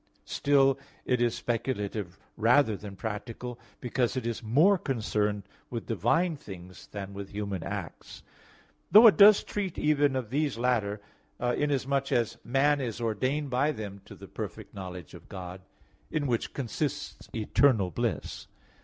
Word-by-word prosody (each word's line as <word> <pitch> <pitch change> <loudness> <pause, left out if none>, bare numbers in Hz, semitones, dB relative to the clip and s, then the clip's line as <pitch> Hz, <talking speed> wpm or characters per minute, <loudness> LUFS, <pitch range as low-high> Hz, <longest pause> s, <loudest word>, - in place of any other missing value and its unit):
Still, 135 -1 +3 0.3
it 125 -1 +1
is 120 -1 +2
speculative 105 -6 -3 0.2
rather 115 0 +4
than 100 0 -9
practical 115 +3 -5 0.2
because 120 -2 -1
it 125 - -3
is 115 -1 -2
more 155 - +4
concerned 105 -6 -1 0.3
with 115 -2 -5
divine 120 - +1
things 95 -6 -11
than 100 -1 -7
with 100 0 -7
human 100 -3 -4
acts; - - -7 0.7
though 215 +3 +10
it 220 - +9
does 205 0 +8
treat 195 -4 -4
even 145 -2 +2
of 125 -4 -3
these 145 -2 0
latter, 110 -4 0 0.4
inasmuch 135 +2 0
as 120 -2 0
man 140 +3 +2
is 120 -3 -3
ordained 130 +6 -1
by 135 +5 +2
them 100 -7 -7
to - - -11
the - - -12
perfect - - -7
knowledge 90 -4 -8
of - - -13
God 90 0 -7 0.5
in 155 -2 -1
which 120 -4 -1
consists 145 +3 -4
eternal 110 -3 +3
bliss. - - -3
120 Hz, 145 wpm, -29 LUFS, 105-140 Hz, 0.7 s, though